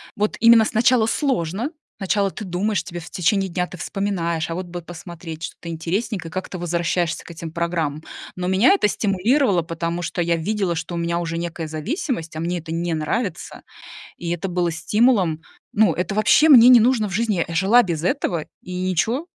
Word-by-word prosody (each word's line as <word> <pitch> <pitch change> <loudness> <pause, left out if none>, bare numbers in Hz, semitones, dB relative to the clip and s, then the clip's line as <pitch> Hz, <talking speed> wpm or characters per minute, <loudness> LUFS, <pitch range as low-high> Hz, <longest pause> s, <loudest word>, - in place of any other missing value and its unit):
вот 210 -1 -1
именно 230 0 +7
сначала 235 +1 +3
сложно, 225 - -1 0.3
сначала 200 0 0
ты 215 - -7
думаешь, 195 +3 -1
тебе 175 -2 -7
в 170 - -10
течение 195 +1 0
дня 180 +1 -1
ты - - -10
вспоминаешь: 170 -3 -2
"А 165 - -3
вот 185 +1 -4
бы 175 0 -6
посмотреть 165 -1 -9
что-то 170 - -7
интересненькое", 180 +3 -3
и - - -18
как 185 0 -4
ты 185 - -6
возвращаешься 170 -1 -1
к - - -14
этим 165 -1 -7
программам. 165 -3 -2 0.3
Но 180 0 -3
меня 190 - +4
это 390 - +2
стимулировало, 205 - +1
потому 170 +1 -3
что 175 - -2
я 170 0 +1
видела, 195 0 -1
что 170 +1 -5
у - - -3
меня 170 0 -1
уже 165 -1 -3
некая 170 -1 -4
зависимость, 165 - -4
а - - -4
мне 175 +2 -2
это 160 0 -9
не 170 +1 -1
нравится, 160 +5 -3 0.6
и 170 - -5
это 175 +2 -2
было 175 -1 0
стимулом. 185 -1 +2 0.3
Ну, 210 -5 +3
это 180 +4 -3
вообще 225 +9 +4
мне 245 -4 +9
не 250 -2 +9
нужно 230 -2 +2
в - - -7
жизни! 210 -4 0
Я 165 - -6
жила 195 +8 +5
без 165 -6 -3
этого 175 - -1 0.2
и 180 0 -7 0.2
ничё, 230 - 0
180 Hz, 195 wpm, -21 LUFS, 170-215 Hz, 0.6 s, мне